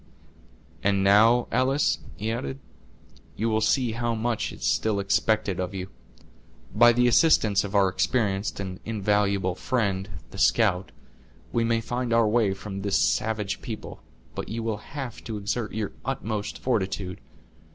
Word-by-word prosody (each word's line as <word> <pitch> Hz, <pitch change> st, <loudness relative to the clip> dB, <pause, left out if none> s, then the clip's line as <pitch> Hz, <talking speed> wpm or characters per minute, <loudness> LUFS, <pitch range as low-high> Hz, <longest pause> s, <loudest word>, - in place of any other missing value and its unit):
"And 100 Hz, -1 st, +2 dB
now, 110 Hz, +5 st, +5 dB
Alice," 130 Hz, +4 st, +2 dB, 0.2 s
he 110 Hz, +2 st, -3 dB
added, 70 Hz, -, -4 dB, 0.8 s
"you 115 Hz, +3 st, -1 dB
will 110 Hz, 0 st, +1 dB
see 125 Hz, +1 st, +2 dB
how 120 Hz, 0 st, -1 dB
much 115 Hz, 0 st, -1 dB
is -, -, -7 dB
still 110 Hz, -2 st, +1 dB
expected 100 Hz, -1 st, +1 dB
of 90 Hz, +1 st, -3 dB
you. 95 Hz, 0 st, -5 dB, 0.8 s
By 120 Hz, +2 st, +7 dB
the 125 Hz, +1 st, +3 dB
assistance 115 Hz, -, +4 dB
of 100 Hz, 0 st, -5 dB
our 100 Hz, -1 st, +5 dB
experienced 95 Hz, -2 st, 0 dB
and 95 Hz, -2 st, -5 dB
invaluable 100 Hz, -3 st, +1 dB
friend, 100 Hz, -2 st, -1 dB, 0.2 s
the -, -, -8 dB
scout, 95 Hz, -5 st, +2 dB, 0.6 s
we 115 Hz, -, +1 dB
may 115 Hz, 0 st, +1 dB
find 120 Hz, +1 st, -2 dB
our 115 Hz, -1 st, +4 dB
way 105 Hz, -3 st, +2 dB
from 100 Hz, 0 st, -6 dB
this 100 Hz, 0 st, +1 dB
savage 105 Hz, -3 st, 0 dB
people, 110 Hz, -2 st, -7 dB, 0.3 s
but -, -, -5 dB
you 115 Hz, +1 st, -3 dB
will 110 Hz, -2 st, -1 dB
have 130 Hz, +2 st, -7 dB
to 110 Hz, -2 st, -4 dB
exert 105 Hz, +2 st, -3 dB
your 105 Hz, -1 st, -3 dB
utmost 110 Hz, -6 st, -3 dB
fortitude. 95 Hz, -6 st, -2 dB
110 Hz, 150 wpm, -26 LUFS, 100-115 Hz, 0.8 s, By